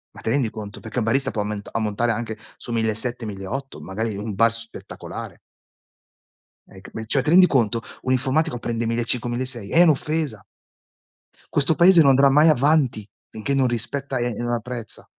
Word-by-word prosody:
Ma - - -11
ti - - -3
rendi 125 -2 +1
conto? 105 -2 -8
Perché 110 +3 -4
un 115 - 0
barista 135 +5 +2
può 105 - -2
aument 105 0 -5
ammontare 115 +2 0
anche 110 -1 -5 0.2
su - - -8
1.700-1.800 115 +1 -3
magari 110 +3 -3
in 100 - -6
un 105 0 -4
bar 115 +3 +2
spettacolare. 115 - -9 1.3
Ec 95 0 -15
beh, 110 - -6
cioè, 135 +4 +2
ti 155 - 0
rendi 180 +1 +7
conto? 115 -5 +1 0.2
Un 130 - -1
informatico 135 +2 +1
prende 115 0 -2
1500-1600. 120 0 -2
È 170 - +5
un'offesa. 150 - 0 1.1
Questo 145 +2 +2
paese 175 +1 +6
non 140 -4 +7
andrà 135 +1 +5
mai 150 +4 +5
avanti 140 -6 +2 0.2
finché 110 +6 -3
non 135 -2 +3
rispetta 125 +4 -2
e 120 - 0
e 120 - 0
non 120 0 -1
apprezza. 120 -1 -5
120 Hz, 170 wpm, -22 LUFS, 110-135 Hz, 1.3 s, rendi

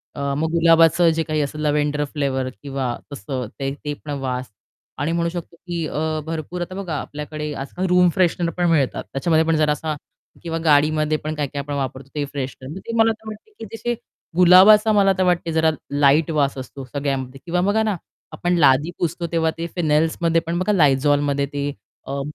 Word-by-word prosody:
अ, 140 0 -2
मग 160 +1 -1
गुलाबाचं 165 0 +5
जे 165 - 0
काही 155 -1 -1
असेल 150 +1 -4
लॅव्हेंडर 150 0 +1
फ्लेवर 135 -3 -1
किंवा 135 -3 -2 0.2
तसं 130 0 -4
ते 135 0 -2
ते 150 - -1
पण 150 - -5
वास 130 -1 -3 0.5
आणि 145 +4 0
म्हणू 170 0 0
शकतो 170 -1 -7
की 170 -1 -4
अ, 155 +1 -2
भरपूर 165 +2 -5
आता 180 +2 -5
बघा 190 -5 -4
आपल्याकडे 150 0 -6
आजकाल 140 +7 -4
रूम 180 0 +5
फ्रेशनर 175 -2 +1
पण 175 -1 +2
मिळतात 145 -6 +1
त्याच्यामध्ये 160 +4 +2
पण 165 - +3
जरा 150 -1 +3
असा 155 0 -2 0.5
किंवा 165 -1 -3
गाडीमध्ये 155 0 +3
पण 155 +1 -4
काय-काय 145 -1 -3
आपण 145 +1 -6
वापरतो 135 -1 -4
ते 145 - -1
फ्रेशनर 140 +3 -6
ते 230 - -3
मला 225 0 +5 0.2
वाटते 215 - -9
की 225 - -6
जसे 240 +1 -2 0.4
गुलाबाचा 190 +5 +7
मला 195 -1 +4
तर 185 - +2
वाटते 175 -2 +1
जरा 160 0 +3 0.2
लाईट 145 +2 +3
वास 140 -3 +1
असतो 130 +1 -7
सगळ्यामध्ये 135 -1 -3
किंवा 175 +1 0
बघा 205 +4 +2
ना, 215 -3 0 0.4
आपण 175 0 0
लादी 145 +2 +4
पुसतो 170 0 -2
तेव्हा 160 -1 +1
ते 170 - -3
फेनेल्समध्ये 165 0 +2
पण 170 +1 -1
बघा 210 +3 +1
Lizolमध्ये 145 -2 +3
ते 145 0 -2 0.4
अ, 140 0 -3
155 Hz, 185 wpm, -21 LUFS, 140-170 Hz, 0.5 s, गुलाबाचा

